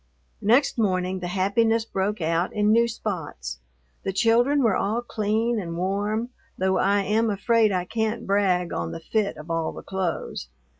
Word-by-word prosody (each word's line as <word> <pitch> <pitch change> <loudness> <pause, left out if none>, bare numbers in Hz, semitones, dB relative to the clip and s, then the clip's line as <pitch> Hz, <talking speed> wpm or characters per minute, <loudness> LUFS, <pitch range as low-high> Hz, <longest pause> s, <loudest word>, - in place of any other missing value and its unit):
Next 235 +5 +3
morning 185 -3 0
the 180 - -4
happiness 220 +5 +1
broke 195 -1 -2
out 165 +2 0
in 210 0 +2
new 235 +1 +4
spots. 150 - -5 0.4
The 195 - -2
children 240 +8 +3
were 220 -5 +3
all 220 +5 0
clean 220 +1 0
and 170 -3 -5
warm, 205 +5 -1 0.3
though 190 0 +1
I 200 0 +2
am 220 +3 +1
afraid 215 +2 +2
I 180 -2 -1
can't 220 +3 -2
brag 190 -3 +1
on 85 -1 -3
the - - -5
fit 205 +4 -1
of 155 +2 -8
all 165 -1 -1
the - - -10
clothes. 185 - -3
200 Hz, 165 wpm, -25 LUFS, 180-225 Hz, 0.4 s, new